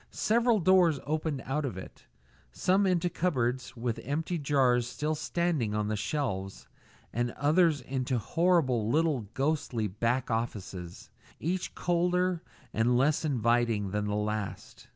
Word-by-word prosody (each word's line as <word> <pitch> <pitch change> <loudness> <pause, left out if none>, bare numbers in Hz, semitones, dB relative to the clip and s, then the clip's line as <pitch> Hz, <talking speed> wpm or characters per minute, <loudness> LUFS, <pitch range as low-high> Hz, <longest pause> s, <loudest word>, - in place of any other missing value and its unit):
Several 230 0 +2
doors 180 -4 +4
opened 155 -2 -2
out 150 +4 -1
of 125 -9 -4
it 95 - -11 0.4
some 190 - +2
into 180 -1 +2
cupboards 130 -9 -1
with 115 -1 -2
empty 160 +5 -2
jars 130 -4 +2
still 150 +5 -2
standing 155 -8 -1
on 105 0 -1
the 110 - 0
shelves, 100 -5 -3 0.5
and 120 +2 0
others 155 +1 +3
into 130 0 -2
horrible 135 - +2
little 150 -5 +1
ghostly 135 -5 0
back 115 +6 -1
offices, 95 -6 -4 0.3
each 180 +3 -2
colder 180 0 +1 0.3
and 120 +2 +2
less 145 +5 +2
inviting 115 -7 +1
than 105 +1 -1
the 105 0 -1
last. 105 -1 -4
135 Hz, 130 wpm, -29 LUFS, 115-165 Hz, 0.5 s, doors